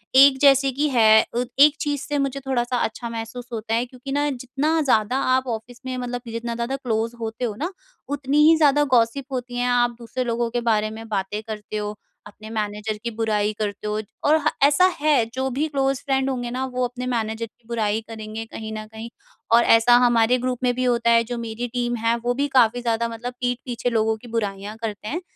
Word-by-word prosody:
एक 270 0 +8
जैसे 275 -1 +5
कि 290 +4 0
है, 220 -4 +6
अत 245 +1 0
एक 295 +1 +7
चीज़ 290 -2 -1
से 295 0 -1
मुझे 275 -1 -1
थोड़ा-सा 245 -1 0
अच्छा 235 0 -3
महसूस 230 +2 -6
होता 225 0 -3
है, 235 +2 +1
क्योंकि 255 +2 -9
ना, 290 +1 +1
जितना 275 +5 -1
ज़्यादा 250 -3 +2 0.2
आप 260 0 -1
ऑफ़िस 235 +2 -12
में 255 -1 -3
मतलब 245 0 -4
जितना 230 +1 -4
ज़्यादा 235 +3 -2
क्लोज़ 230 -3 -2
होते 225 +2 -3
हो 215 -3 -3
ना, 320 - -3 0.4
उतनी 285 0 -1
ही 325 - +7
ज़्यादा 295 -2 +4
गॉसिप 235 +3 +2
होती 245 -1 -4
हैं। 245 0 0
आप 240 -1 +2
दूसरे 235 +2 -4
लोगों 235 -1 -1
के 240 +1 -2
बारे 215 -2 +1
में 225 +1 -9
बातें 205 0 -2
करते 215 -1 -5
हो, 210 0 -4 0.3
अपने 215 +1 -12
मैनेजर 210 0 -3
की 235 - -2
बुराई 215 -2 0
करते 205 0 -3
हो, 210 0 -1 0.2
और 305 +2 +5
ह - - +6
ऐसा 290 +6 +5
है, 290 -6 +3
जो 265 +1 -1
भी 285 +5 -1
क्लोज़ 270 -2 0
फ्रेंड 270 -1 +1
होंगे 245 -2 -3
ना, 255 +2 -2
वो 255 -1 -2
अपने 250 +1 -7
मैनेजर 225 -2 -2
की 225 +1 -23
बुराई 220 -2 0
करेंगे 220 0 -6
कहीं 220 0 -7
न 215 0 -5
कहीं। 220 +1 -7 0.5
और 235 - +6
ऐसा 230 +2 +6
हमारे 240 0 +4
ग्रुप 250 0 -2
में 250 -1 +3
भी 255 - -1
होता 235 -2 +2
है, 230 0 +5
जो 240 +1 -5
मेरी 230 +1 -4
टीम 240 -1 -1
है, 230 0 +1
वो 240 +1 -1
भी 280 +3 0
काफ़ी 245 -3 +3
ज़्यादा 235 -1 0
मतलब 235 +2 -6
पीठ 245 -1 0
पीछे 245 -1 -2
लोगों 220 -1 +1
की 240 - -14
बुराइयाँ 205 -2 -3
करते 210 -2 -5
हैं। 335 +10 -3
240 Hz, 220 wpm, -23 LUFS, 225-260 Hz, 0.5 s, एक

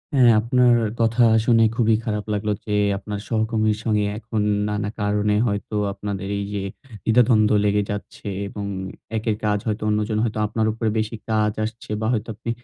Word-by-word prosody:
হ্যাঁ 125 -3 +6
আপনার 125 +1 +4 0.3
কথা 115 +2 +3 0.2
শুনে 115 -2 +5
খুবই 115 -2 +3
খারাপ 105 -2 -2
লাগলো 105 +1 -1
যে, 105 - -5 0.3
আপনার 105 0 -5
সহকর্মীর 110 -1 +1
সঙ্গে 105 -2 +1
এখন 110 -1 -3 0.3
নানা 105 0 -2
কারণে 105 0 +1
হয়তো 100 0 -3 0.2
আপনাদের 100 -2 -5
এইযে, 100 0 -3 0.5
দ্বিধাদ্বন্দ্ব 110 -2 +4
লেগে 105 0 +2
যাচ্ছে 105 0 -7 0.2
এবং 100 0 -6 0.5
একের 110 0 0
কাজ 105 0 +2
হয়তো 105 0 -2
অন্যজন 105 +1 0
হয়তো 110 -2 -1
আপনার 110 +1 0
উপরে 115 0 -1
বেশি 110 +1 -2
কাজ 110 -1 +2
আসছে। 110 +1 -6
বা 110 - 0
হয়তো 110 0 -2
আপনি 115 +2 -7
110 Hz, 160 wpm, -22 LUFS, 105-115 Hz, 0.5 s, হ্যাঁ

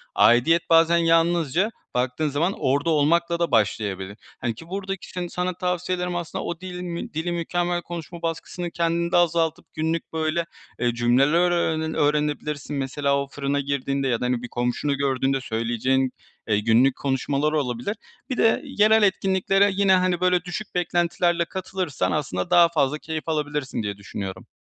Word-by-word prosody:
Aidiyet 145 +9 +4
bazen 165 +1 +5
yalnızca, 165 - +2 0.2
baktığın 125 +5 0
zaman, 160 +7 0
orada 140 +5 +1
olmakla 170 +3 +2
da 170 - 0
başlayabilir. 100 -3 0 0.2
Hani, 120 -2 -1
ki 165 - -12
buradaki 195 0 -5
sen 180 -1 -4
sana 180 +1 -2
tavsiyelerim 180 0 -2
aslında 175 -2 -4
o 170 - -4
dili 180 -1 -6
mi 170 -1 -5
dili 160 +3 -2
mükemmel 175 +1 -1
konuşma 170 0 -8
baskısını 170 +1 -4
kendinde 170 +1 0
azaltıp 165 -2 +1
günlük 160 +1 -2
böyle, 160 +1 0 0.3
eee, 120 -1 +1
cümleler 125 +6 +3
öğrene 160 -2 0
öğrenebilirsin. 150 0 0
Mesela, 140 +1 0
o 140 - -3
fırına 140 0 -2
girdiğinde 140 -1 -1
ya 120 -3 0
da, - - 0
hani, 125 -1 0
bir - - -4
komşunu 125 +4 -1
gördüğünde 135 -1 0
söyleyeceğin, 120 +3 0 0.4
eee, 105 -2 +2
günlük 115 +5 +3
konuşmalar 140 +2 0
olabilir. 135 - -1 0.3
Bir 255 - -2
de 225 - +3
yerel 215 +1 +4
etkinliklere 195 0 +2
yine, 195 0 +3
hani, 185 -1 +2
böyle, 180 -1 +3
düşük 185 +3 -6
beklentilerle 175 0 +1
katılırsan 185 -4 -3
aslında 115 -12 -2
daha 170 -1 +6
fazla 150 -3 +1
keyif 160 +1 -5
alabilirsin 145 -6 -2
diye 100 -1 -4
düşünüyorum. 95 -2 -7
160 Hz, 155 wpm, -24 LUFS, 135-175 Hz, 0.4 s, daha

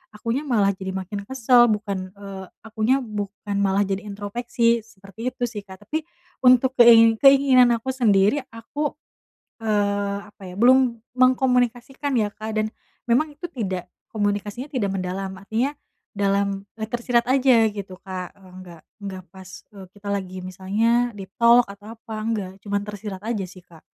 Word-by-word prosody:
akunya 230 +5 -2
malah 210 -6 +3
jadi 190 0 -6
makin 190 +2 -4
kesel 245 -2 +4
bukan," 200 -3 -2
eee, 195 -1 -9 0.2
"akunya 225 +5 +1
bukan 205 -2 -4
malah 195 0 +2
jadi 195 0 -2
introspeksi." 230 +3 0
Seperti 205 +1 -10
itu 255 -1 -7
sih 230 -3 -5
Kak 190 0 -14
tapi 315 +9 -2 0.4
untuk 255 0 +5
kei 230 -2 +7
keinginan 275 -2 +6
aku 235 +3 -3
sendiri 215 -1 +3
aku, 275 +7 -4 0.7
eee, 205 -2 0
apa - - -20
ya 180 - -9
belum 250 +2 +4 0.2
mengkomunikasikan 255 +1 +1
ya 210 -3 +1
Kak 220 +1 -6
dan, 215 0 0 0.3
memang 250 +6 +2
itu 345 +2 -7
tidak, 190 -8 -3 0.2
komunikasinya 205 +3 -2
tidak 235 -7 0
mendalam. 190 0 -4
Artinya 225 +9 -2 0.4
dalam 200 0 0 0.2
e 220 - -3
tersirat 240 +1 0
aja 255 -4 +4
gitu 195 -3 -8
Kak, 185 -2 -6
eee, - - -24 0.2
nggak 175 -3 -13 0.2
nggak 190 -2 -6
pas 185 +1 -12
e 200 -2 -12
kita 205 0 -10
lagi 190 -2 -3
misalnya 210 +7 0
deep 195 -2 -9
talk, 235 0 +5
atau 205 +2 -10
apa, 225 0 -9
nggak. 210 -5 -2
Cuman 200 -1 -1
tersirat 205 -2 -6
aja 220 -3 -2
sih 185 0 -12
Kak. 170 -2 -19
215 Hz, 155 wpm, -23 LUFS, 195-240 Hz, 0.7 s, kei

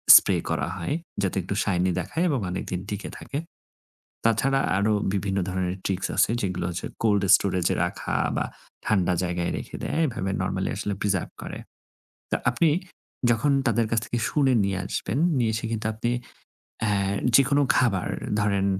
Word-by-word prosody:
Spray - - +6
করা 75 - 0
হয়। 90 +10 -2 0.3
যাতে 95 -2 0
একটু 100 - -3
শাইনি 90 -2 +1
দেখায় 160 - -2
এবং 140 -4 +1
অনেকদিন 90 0 -3
টিকে 105 0 -4
থাকে। 140 - -6 0.9
তাছাড়া 135 +5 +3 0.2
আরো 105 +2 +2 0.2
বিভিন্ন 100 0 -1
ধরনের 90 0 -1
ট্রিকস 95 -1 0
আছে - - +4
যেগুলো 90 -3 -2
হচ্ছে, 85 - -4 0.2
cold 105 -3 +3
storage 90 -3 0
এ - - -2
রাখা - - -3 0.2
বা - - 0 0.4
ঠান্ডা 95 -4 +2
জায়গায় 90 -1 -1
রেখে - - -7
দেয়, - - -1
এভাবে 95 -7 -3
নরমালি 95 0 -1 0.3
preserve 100 -4 0
করে। - - -6 0.7
তা - - +2
আপনি 165 - +3 0.6
যখন 120 +5 +2 0.2
তাদের 115 0 +2
কাছ 115 - +3
থেকে 120 - -2
শুনে 135 -3 +3
নিয়ে 100 -1 0
আসবেন, 110 +9 -2 0.2
নিয়ে 115 -3 +2
এসে 115 - -3
কিন্তু 110 -1 -2
আপনি 120 +2 -1 0.7
অ্যা 105 - +2 0.4
যেকোনো 140 +2 +5
খাবার 105 -8 +2 0.3
ধরেন 100 -2 +1
100 Hz, 155 wpm, -25 LUFS, 95-115 Hz, 0.9 s, Spray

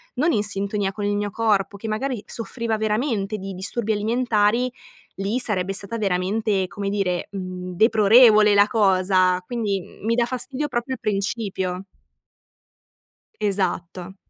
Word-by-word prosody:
non 310 +7 +2
in 210 - +2
sintonia 200 -1 -1
con 205 +1 -5
il 205 0 0
mio 205 0 -1
corpo, 205 -2 0
che 220 - -7
magari 220 +1 -2
soffriva 230 0 -3
veramente 215 -1 -1
di 195 0 -6
disturbi 220 +4 -2
alimentari, 230 +2 +1 0.5
lì 200 +5 -1
sarebbe 195 -5 0
stata 200 +4 -4
veramente, 195 +1 0
come 200 +1 -4
dire, 195 -3 -1
mhmm, 185 -2 -6
deplorevole 215 0 +6
la 205 0 +6
cosa, 185 -3 +3
quindi, 215 -5 -1
mhmm, 200 - -14
mi 230 +1 +2
dà 240 - +2
fastidio 260 +4 -4
proprio 255 0 -3
principio. 195 -3 -2 1.6
Esatto. 185 -2 -2
205 Hz, 135 wpm, -23 LUFS, 195-230 Hz, 1.6 s, deplorevole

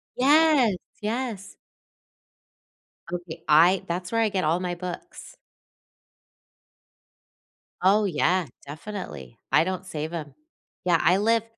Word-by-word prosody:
Yes! 285 -5 +4 0.3
Yes. 220 -2 -4 1.6
Okay. 175 -6 -6
I 170 +6 +5
That's 180 +1 -4
where 230 0 +1
I 220 - +2
get 190 -3 -1
all 165 +3 +1
my 180 -1 -3
books. 180 - -8 2.5
Oh, 205 +3 +4
yeah. 180 0 +1 0.2
Definitely. 145 - -8
I - - +5
don't 185 +1 -4
save 160 -2 -5
'em. 150 -4 -6 0.5
Yeah, 175 -2 +4
I 180 +2 +4
live 225 +2 +2
185 Hz, 110 wpm, -25 LUFS, 170-215 Hz, 2.5 s, I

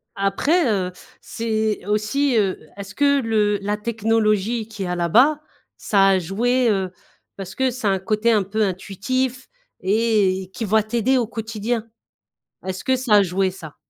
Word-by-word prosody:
Après, 240 - +1
heu, 185 -3 -1 0.3
c'est 220 -3 -2
aussi, 215 +7 0
heu, 195 -3 +1 0.2
est-ce 200 0 -9
que 280 -1 +3
le 210 -3 +1
la 205 +1 -1
technologie, 220 0 0
qu'il 210 -4 -6
y - - -4
a 180 - -2
là-bas, 240 - +3 0.4
ça 195 -2 +3
a 190 -1 +3
joué, 235 +8 +1
heu? 190 -3 0 0.5
Parce 190 -1 -8
que 265 0 +1
c'est 240 -4 -3
un 195 -1 +2
côté 215 +4 +1
un 210 -3 +3
peu 215 +3 -1
intuitif 240 +7 -2 0.3
et 195 -2 +1
qui 225 - -4
va 215 +1 +2
t'aider 235 +4 +1
au 240 -3 0
quotidien. 225 +1 -3 0.8
Est-ce 185 -1 -4
que 260 - +2
ça 250 -4 +2
a 205 - +6
joué, 190 +1 0
ça? 160 -5 -11
215 Hz, 165 wpm, -21 LUFS, 195-235 Hz, 0.8 s, a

